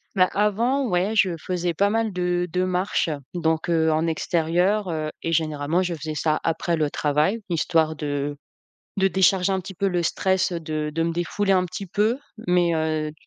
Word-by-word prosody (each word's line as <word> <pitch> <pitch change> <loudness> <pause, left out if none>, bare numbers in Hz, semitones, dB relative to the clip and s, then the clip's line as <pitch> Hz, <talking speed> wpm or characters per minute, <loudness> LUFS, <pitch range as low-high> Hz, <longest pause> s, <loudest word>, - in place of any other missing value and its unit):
Bah, 185 -2 +4
avant, 230 +7 +1
ouais, 185 +2 +1
je 190 -5 +3
faisais 175 +1 -2
pas 200 +5 +2
mal 225 -1 0
de 180 0 0
de 180 - +1
marche, 185 -1 0 0.2
donc 160 -2 0
heu, 160 -2 +2
en 160 +1 +1
extérieur, 175 +5 +1
heu, 155 -1 -2
et 165 - -1
généralement 155 +2 0
je 175 -2 -2
faisais 155 0 -5
ça 155 0 0
après 165 +1 0
le 150 -2 0
travail, 150 +9 +1
histoire 160 -1 +1
de 145 -1 -3 0.6
de 195 -1 +3
décharger 190 0 +3
un 190 - 0
petit 190 +1 -9
peu 195 +3 -1
le 180 -2 0
stress, 190 +3 +1
de 155 -3 -3
de 165 - 0
me 165 - 0
défouler 195 +4 0
un 185 -1 +3
petit 185 +2 -6
peu 215 +7 +1 0.3
mais 175 -2 +3
heu, 155 -1 -1
175 Hz, 185 wpm, -24 LUFS, 160-190 Hz, 0.6 s, Bah